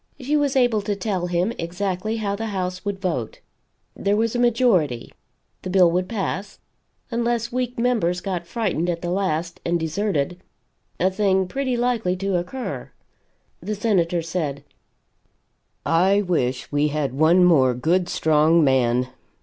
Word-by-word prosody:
She 275 +4 -1
was 290 -2 +1
able 245 -5 +3
to 205 0 -2
tell 190 -3 -2
him 175 +5 0
exactly 185 +5 -2
how 200 -2 -1
the 225 +2 -4
House 185 -3 -3
would 200 -1 -3
vote. 165 - -3 0.6
There 200 +1 0
was 225 +1 0
a - - 0
majority 225 - +2 0.5
the 185 - -5
bill 180 -2 +5
would 180 +1 -1
pass, 200 -2 -3 0.5
unless 235 0 -1
weak 250 0 -2
members 230 -8 +1
got 180 -3 -4
frightened 180 -5 -1
at 170 0 -3
the 175 - -2
last, 175 -3 -2
and 170 0 0
deserted 175 -1 -1 0.6
a 185 +2 +2
thing 190 -1 +1
pretty 260 +3 -2
likely 235 -7 0
to 195 0 -1
occur. 235 +9 -5 0.7
The 215 - -3
Senator 180 -6 +1
said: 155 -5 -3 1.2
"I 190 +5 +3
wish 130 -9 -1
we 145 +1 +2
had 145 -3 -2
one 160 +6 +4
more 135 -8 +4
good 175 +8 +1
strong 160 +1 +3
man. 125 -2 +2
185 Hz, 150 wpm, -23 LUFS, 165-215 Hz, 1.2 s, bill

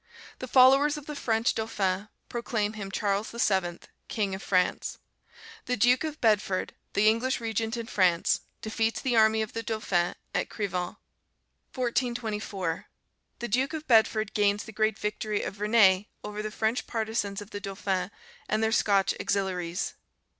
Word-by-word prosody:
The 255 - -5
followers 270 +4 +6
of 295 - -9
the 300 - -6
French 225 -4 +1
Dauphin 205 -2 -1 0.2
proclaim 220 -3 -2
him 205 -3 -6
Charles 200 +1 -1
VII., 190 -7 0 0.3
King 205 -3 -1
of 190 - -5
France. 180 -2 0 0.7
The 250 - -1
Duke 245 +5 +4
of 310 -1 -4
Bedford, 205 -4 +1 0.2
the 210 +1 +3
English 230 +4 +2
Regent 225 0 -2
in 230 - -4
France, 180 -6 +2 0.2
defeats 225 0 0
the 250 -2 0
army 220 0 +5
of 215 - -8
the 230 - -2
Dauphin 200 -6 0 0.2
at - - -1
Crevant. 185 -4 -3 0.8
1424. 225 -8 -2 0.5
The 240 - -4
Duke 255 +7 +1
of 310 -1 -5
Bedford 220 -2 +3
gains 205 0 +2
the - - -10
great 215 0 +1
victory 210 0 -2
of - - -4
Verneuil 205 -2 +4 0.2
over 210 0 -5
the 215 - -3
French 220 +2 -1
partizans 220 -3 -2
of 205 0 -10
the 205 - -4
Dauphin, 195 -2 -2 0.4
and 215 +1 +1
their 220 - +2
Scotch 200 -3 +3
auxiliaries. 185 -2 -1
215 Hz, 155 wpm, -28 LUFS, 195-230 Hz, 0.8 s, followers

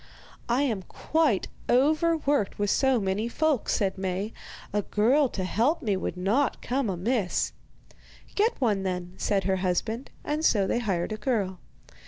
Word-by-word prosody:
'I 250 +4 +3
am 225 -9 0
quite 295 - 0 0.2
overworked 295 - +2
with 205 -1 +1
so 265 -3 +3
many 200 +3 -1
folk,' 305 -2 0
said 195 -1 0
Maie; 190 +3 -2 0.4
'a 210 - +2
girl 250 +8 +3
to 190 - -4
help 240 - +1
me 210 -4 +1
would 185 - -3
not 220 +10 +1
come 255 -2 0
amiss.' 195 +2 0 0.8
'Get 435 +3 +1
one, 215 -7 +2
then,' 180 -1 -3
said 195 -2 0
her 190 0 +1
husband; 195 +7 -1
and 300 +2 -2
so 205 -10 +4
they 235 - 0
hired 195 -5 -1
a 215 - -2
girl. 205 -5 -1
215 Hz, 155 wpm, -27 LUFS, 190-270 Hz, 0.8 s, so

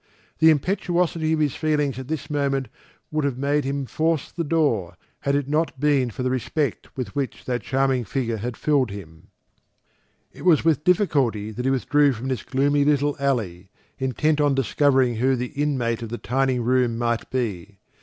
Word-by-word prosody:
The 160 - +7
impetuosity 170 0 +1
of 160 - 0
his 145 -3 +1
feelings 150 -4 0
at 130 - -7
this 155 0 -4
moment 140 -3 -1 0.4
would 155 -1 0
have 140 -3 -1
made 140 +1 0
him 140 0 -2
force 160 +2 -1
the 170 - -3
door, 145 - 0 0.2
had 140 0 0
it 140 -2 0
not 150 -2 -1
been 140 -3 +2
for 125 +3 -5
the 130 - 0
respect 140 +4 -2
with 120 -7 -5
which 140 -2 -3
that 125 -2 -2
charming 135 +2 +1
figure 115 -2 -2
filled 125 +3 0
him. 80 -5 -10 1.1
It - - -12
was 165 -3 +4
with 155 -3 +2
difficulty 140 - +1
that 125 +3 -5
he - - +3
withdrew 140 +2 +3
from 125 +3 -5
this 130 -6 -2
gloomy 140 +2 +1
little 145 0 +2
alley, 105 -10 -1 0.3
intent 150 +4 +1
on 145 -2 +3
discovering 135 -1 +2
who 130 +3 +2
the 125 0 -3
inmate 130 -6 -1
of 115 - -5
the 120 - -4
tiny 130 +4 0
room 125 -1 +1
might 120 -1 -1
be. 105 -6 -3
135 Hz, 175 wpm, -23 LUFS, 120-150 Hz, 1.1 s, The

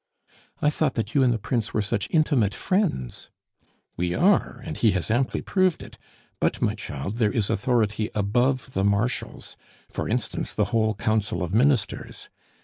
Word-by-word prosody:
"I 150 - +4
thought 150 -3 0
that 115 -1 -2
you 140 - +4
and 130 -2 +4
the 115 - +1
Prince 115 +1 -2
were 110 - +2
such 100 0 -1
intimate 140 - +2
friends." 185 - -1 0.7
"We 90 0 -1
are, 185 -9 +2
and - - -5
he 110 -3 +3
has 90 0 -2
amply 125 +3 0
proved 185 -3 +1
it; - - -13 0.4
but, - - 0
my - - +1
child, 85 +11 -5
there 110 -3 +3
is 105 -3 0
authority 110 -1 +1
above 120 +5 +1
the 95 - 0
Marshal's 100 +5 -1 0.4
for - - -3
instance, - - -2
the - - +2
whole 110 -1 +2
Council 105 -2 0
of 90 +1 -4
Ministers. 125 +1 0
110 Hz, 165 wpm, -25 LUFS, 100-130 Hz, 0.7 s, I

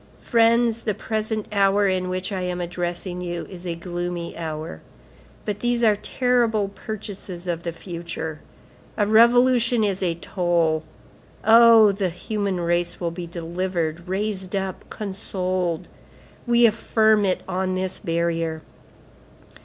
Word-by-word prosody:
Friends, 230 0 +3
the 215 -3 -1
present 220 0 -3
hour 200 0 +3
in 185 -1 0
which 185 +2 -3
I 190 -2 -2
am 180 0 -2
addressing 175 +1 -3
you, 175 -1 -4
is 180 -1 -8
a 170 - -2
gloomy 175 0 -4
hour; 155 - -5 0.6
but 205 -1 -3
these 240 0 0
are 215 -2 +5
terrible 230 -2 +1
purchases 200 -3 -7
of 170 -2 -2
the 170 - -3
future. 165 -2 -6 0.6
A 210 - +3
revolution 235 +1 +5
is 195 -2 0
a 175 -3 0
toll. 170 -3 0 0.6
Oh! 225 -1 +8
the 195 -2 -1
human 195 +1 -3
race 175 0 0
will 170 -2 -2
be 170 0 -6
delivered, 170 0 -3
raised 190 0 -2
up, 190 -1 -4
consoled! 185 -4 -3 0.6
We 240 0 +5
affirm 220 -1 +3
it 185 -2 0
on 185 0 -1
this 185 0 -2
barrier. 165 -2 -1
185 Hz, 130 wpm, -23 LUFS, 175-215 Hz, 0.6 s, Oh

